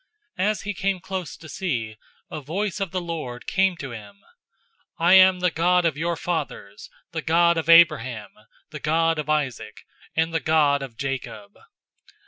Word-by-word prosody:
As 205 Hz, 0 st, 0 dB
he 210 Hz, -, -3 dB
came 195 Hz, 0 st, -1 dB
close 190 Hz, -2 st, -6 dB
to 165 Hz, -, -13 dB
see, 125 Hz, -, -3 dB, 0.4 s
a 155 Hz, -, -5 dB
voice 190 Hz, +8 st, -3 dB
of 195 Hz, -2 st, -2 dB
the 185 Hz, +1 st, -3 dB
Lord 155 Hz, -8 st, -6 dB
came 190 Hz, -2 st, +1 dB
to 135 Hz, -5 st, -7 dB
him, 105 Hz, -3 st, -10 dB
007:032 100 Hz, -, -32 dB, 0.8 s
'I 175 Hz, -, +6 dB
am 190 Hz, -1 st, +7 dB
the 180 Hz, -1 st, +2 dB
God 175 Hz, +2 st, +2 dB
of 160 Hz, -4 st, +1 dB
your 170 Hz, +3 st, -1 dB
fathers, 160 Hz, -, -5 dB, 0.2 s
the 160 Hz, -, -3 dB
God 170 Hz, +2 st, +3 dB
of 165 Hz, -1 st, -3 dB
Abraham, 130 Hz, -10 st, +4 dB, 0.4 s
the 150 Hz, -, -7 dB
God 165 Hz, +2 st, +1 dB
of 150 Hz, 0 st, -5 dB
Isaac, 145 Hz, -5 st, -2 dB, 0.3 s
and 160 Hz, +1 st, 0 dB
the 165 Hz, -, +1 dB
God 145 Hz, -1 st, +2 dB
of 130 Hz, -4 st, -8 dB
Jacob.' 130 Hz, -7 st, -5 dB
165 Hz, 170 wpm, -24 LUFS, 135-180 Hz, 0.8 s, am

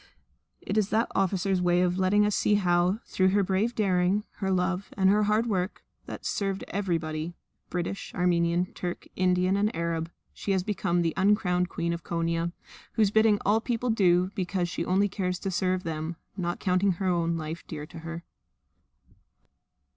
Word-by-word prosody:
It 205 Hz, +2 st, 0 dB
is 205 Hz, -1 st, 0 dB
that 225 Hz, +2 st, +1 dB
officer's 190 Hz, -1 st, +1 dB
way 175 Hz, 0 st, +3 dB
of 180 Hz, +1 st, 0 dB
letting 205 Hz, +3 st, +4 dB
us 210 Hz, -, +1 dB
see 210 Hz, -, +3 dB
how, 180 Hz, +1 st, +2 dB
through 185 Hz, -, +1 dB
her 200 Hz, +1 st, +3 dB
brave 200 Hz, +6 st, 0 dB
daring, 190 Hz, 0 st, +2 dB
her 195 Hz, -, -2 dB
love, 185 Hz, +1 st, 0 dB
and 190 Hz, -1 st, +4 dB
her 210 Hz, +1 st, +3 dB
hard 215 Hz, +2 st, +2 dB
work, 190 Hz, -3 st, -2 dB, 0.2 s
that -, -, -7 dB
served 195 Hz, -1 st, -1 dB
everybody, 165 Hz, -4 st, -2 dB, 0.3 s
British, 180 Hz, +2 st, -3 dB
Armenian, 175 Hz, 0 st, +1 dB
Turk, 175 Hz, -1 st, -5 dB
Indian, 185 Hz, +1 st, +2 dB
and 205 Hz, +1 st, +2 dB
Arab, 165 Hz, 0 st, -2 dB, 0.2 s
she 200 Hz, -, -2 dB
has 190 Hz, -1 st, +1 dB
become 175 Hz, -3 st, 0 dB
the 165 Hz, -2 st, 0 dB
uncrowned 180 Hz, -3 st, +2 dB
Queen 170 Hz, 0 st, -2 dB
of 170 Hz, 0 st, -6 dB
Konia, 165 Hz, 0 st, -1 dB, 0.4 s
whose 215 Hz, -4 st, +3 dB
bidding 220 Hz, -1 st, +4 dB
all 210 Hz, +2 st, +4 dB
the -, -, -15 dB
people 240 Hz, 0 st, 0 dB
do 185 Hz, -3 st, +3 dB
because 180 Hz, -2 st, -1 dB
she 175 Hz, -, -3 dB
only 195 Hz, +3 st, +2 dB
cares 180 Hz, -2 st, -2 dB
to 195 Hz, +1 st, -4 dB
serve 185 Hz, 0 st, 0 dB
them, 160 Hz, +1 st, -4 dB, 0.2 s
not 175 Hz, -3 st, -2 dB
counting 185 Hz, +1 st, +2 dB
her 190 Hz, +3 st, -4 dB
own 170 Hz, -2 st, +1 dB
life 160 Hz, +1 st, -5 dB
dear 150 Hz, -2 st, -6 dB
to 165 Hz, -, -11 dB
her. 165 Hz, +1 st, -7 dB
185 Hz, 175 wpm, -27 LUFS, 175-200 Hz, 0.4 s, letting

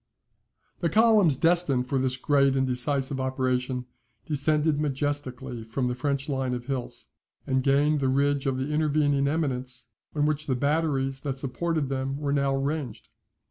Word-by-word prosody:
The 170 Hz, -, 0 dB
columns 215 Hz, -5 st, +5 dB
destined 165 Hz, -4 st, +3 dB
for 135 Hz, +1 st, -1 dB
this 130 Hz, -1 st, 0 dB
great 140 Hz, 0 st, +3 dB
and 130 Hz, 0 st, +2 dB
decisive 130 Hz, +2 st, 0 dB
operation 130 Hz, -1 st, -1 dB, 0.4 s
descended 150 Hz, 0 st, +1 dB
majestically 135 Hz, -4 st, -3 dB
from 115 Hz, +4 st, -2 dB
the 125 Hz, -, 0 dB
French 140 Hz, +2 st, -2 dB
line 130 Hz, -3 st, -1 dB
of 120 Hz, -1 st, -6 dB
hills, 130 Hz, -2 st, -4 dB, 0.4 s
and 130 Hz, 0 st, +1 dB
gained 145 Hz, +3 st, +3 dB
the 135 Hz, -, 0 dB
ridge 140 Hz, +1 st, +1 dB
of 130 Hz, -1 st, 0 dB
the 135 Hz, +3 st, -3 dB
intervening 150 Hz, -2 st, +2 dB
eminence, 130 Hz, -6 st, -2 dB, 0.3 s
on 145 Hz, -1 st, +2 dB
which 155 Hz, 0 st, -1 dB
the 130 Hz, -, +1 dB
batteries 140 Hz, -1 st, 0 dB
that 135 Hz, -3 st, -3 dB
supported 145 Hz, +2 st, -2 dB
them 135 Hz, 0 st, -2 dB
were 145 Hz, -1 st, -1 dB
now 140 Hz, -1 st, +1 dB
ranged. 135 Hz, -4 st, -3 dB
140 Hz, 155 wpm, -26 LUFS, 130-150 Hz, 0.4 s, columns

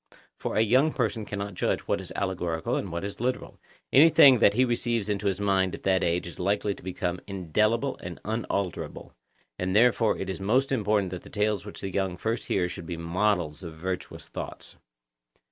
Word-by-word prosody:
For -, -, -4 dB
a -, -, +4 dB
young 130 Hz, +8 st, +3 dB
person 110 Hz, -3 st, -1 dB
cannot 100 Hz, 0 st, -4 dB
judge -, -, 0 dB
what -, -, -1 dB
is -, -, -10 dB
allegorical 90 Hz, -4 st, -1 dB
and 95 Hz, -, -3 dB
what 85 Hz, +2 st, -3 dB
is 100 Hz, 0 st, -5 dB
literal; 125 Hz, +2 st, -3 dB, 0.3 s
anything 140 Hz, -3 st, +8 dB
that 105 Hz, -2 st, +5 dB
he 130 Hz, +2 st, +4 dB
receives 120 Hz, -3 st, -1 dB
into 100 Hz, 0 st, -1 dB
his 95 Hz, 0 st, 0 dB
mind 95 Hz, -2 st, +1 dB
at -, -, -13 dB
that 95 Hz, -1 st, +2 dB
age 85 Hz, +1 st, 0 dB
is 85 Hz, -3 st, -9 dB
likely 100 Hz, +2 st, 0 dB
to -, -, -14 dB
become 90 Hz, -1 st, -3 dB
indelible 105 Hz, -, 0 dB
and 90 Hz, 0 st, -7 dB
unalterable; 100 Hz, -4 st, -3 dB, 0.5 s
and 95 Hz, +1 st, -1 dB
therefore 115 Hz, 0 st, +4 dB
it 95 Hz, -, -4 dB
is 95 Hz, -, -4 dB
most 125 Hz, +8 st, +2 dB
important 105 Hz, -6 st, +1 dB
that 90 Hz, -, -5 dB
the -, -, -13 dB
tales 105 Hz, -1 st, -1 dB
which 105 Hz, -, -9 dB
the 95 Hz, -2 st, -5 dB
young 95 Hz, -2 st, -1 dB
first 115 Hz, +4 st, -2 dB
hear 90 Hz, -2 st, +1 dB
should 85 Hz, -2 st, -7 dB
be 85 Hz, -, -4 dB
models 85 Hz, -1 st, 0 dB
of 85 Hz, -3 st, -8 dB
virtuous 90 Hz, +3 st, -5 dB
thoughts. -, -, -7 dB
100 Hz, 195 wpm, -27 LUFS, 90-110 Hz, 0.5 s, anything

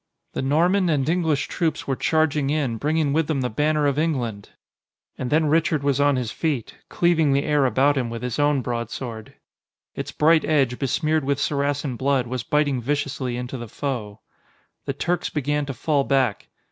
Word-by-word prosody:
The -, -, -2 dB
Norman 175 Hz, +7 st, +2 dB
and 140 Hz, -4 st, +1 dB
English 160 Hz, -4 st, +1 dB
troops 165 Hz, -3 st, -2 dB
were 135 Hz, -, -1 dB
charging 155 Hz, -1 st, +1 dB
in, 140 Hz, -6 st, 0 dB
bringing 150 Hz, +1 st, 0 dB
with 160 Hz, 0 st, +1 dB
them 150 Hz, -4 st, 0 dB
the 125 Hz, -, -2 dB
banner 150 Hz, +5 st, +1 dB
of 140 Hz, 0 st, +1 dB
England! 120 Hz, -11 st, -2 dB, 0.7 s
And 125 Hz, -, -4 dB
then 155 Hz, +3 st, +3 dB
Richard 155 Hz, -1 st, +2 dB
was 140 Hz, -1 st, +1 dB
on 145 Hz, -1 st, +4 dB
his 125 Hz, -4 st, -2 dB
feet, 140 Hz, -7 st, -2 dB, 0.2 s
cleaving 165 Hz, -5 st, +2 dB
the 140 Hz, +1 st, +2 dB
air 145 Hz, -3 st, +2 dB
about 135 Hz, +4 st, +2 dB
him 125 Hz, -3 st, -1 dB
with 115 Hz, +1 st, -6 dB
his 125 Hz, +1 st, -3 dB
own 145 Hz, -2 st, +2 dB
broadsword. 115 Hz, -1 st, -5 dB, 0.6 s
Its -, -, -5 dB
bright 160 Hz, +1 st, +4 dB
edge, 135 Hz, -5 st, +1 dB
besmeared 155 Hz, +3 st, 0 dB
with 140 Hz, 0 st, 0 dB
Saracen 145 Hz, -2 st, -1 dB
blood, 135 Hz, -1 st, +1 dB
was 125 Hz, +1 st, -3 dB
biting 145 Hz, 0 st, +1 dB
viciously 135 Hz, -2 st, -2 dB
into 125 Hz, +1 st, -5 dB
the 120 Hz, -, -6 dB
foe. 110 Hz, -4 st, -4 dB, 0.6 s
The 140 Hz, -, -2 dB
Turks 175 Hz, +5 st, -1 dB
began 145 Hz, 0 st, -1 dB
to 135 Hz, -, -3 dB
fall 145 Hz, -1 st, +1 dB
back. 135 Hz, -6 st, 0 dB
140 Hz, 180 wpm, -23 LUFS, 125-155 Hz, 0.7 s, on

